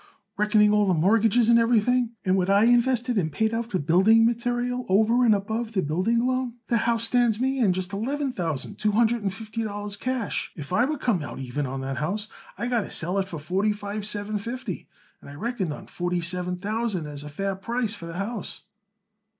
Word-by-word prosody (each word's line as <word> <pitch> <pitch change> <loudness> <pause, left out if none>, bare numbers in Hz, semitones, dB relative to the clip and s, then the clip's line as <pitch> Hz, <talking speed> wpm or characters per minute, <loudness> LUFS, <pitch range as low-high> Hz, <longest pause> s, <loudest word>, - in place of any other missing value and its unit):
Reckoning 210 0 +4
all 210 -1 +3
the 185 - +3
mortgages 220 +6 +3
and 235 0 +6
everything, 235 +1 +2
and 185 0 +3
what 185 0 +1
I 200 +1 +5
invested 240 0 +3
and 160 -4 -1
paid 220 +8 0
out 230 0 -2
for 190 - 0
building 190 +9 +4
material 245 +1 -1
over 220 +6 +4
and 225 -3 +5
above 220 +3 -3
the 190 -3 +1
building 190 +11 +1
loan, 255 -2 -1
that 230 -2 +1
house 230 -1 +2
stands 230 -2 +3
me 265 +1 0
in 215 -7 +4
just 185 +1 -3
eleven 270 +7 -2
thousand 170 - -3
two 210 -1 +1
hundred 235 +1 +2
and 200 -1 -1
fifty 220 +3 -5
dollars 205 -1 -3
cash. 255 -1 -2
If 150 +1 -7
I 235 - +4
would 295 0 -3
come 215 -9 +1
out 145 - -7
even 135 +2 -3
on 135 +1 -4
that 135 0 -4
house 205 +8 -2 0.3
I - - -3
got 240 -2 +1
to - - -7
sell 180 +4 -1
it 190 - -1
for 170 - -6
forty 190 +8 0
five 205 0 -5
seven 210 0 -2
fifty, 235 +5 -6 0.3
and - - -12
I 140 - -10
reckoned 210 -2 -2
on 145 - -7
forty 175 0 -2
seven 180 +1 -2
thousand 210 -3 -2
as 145 -1 -7
a 150 - -7
fair 195 +6 -3
price 230 +3 -2
for 170 -6 -8
the 165 +1 -7
house." 205 +1 -4
210 Hz, 215 wpm, -25 LUFS, 185-235 Hz, 0.3 s, and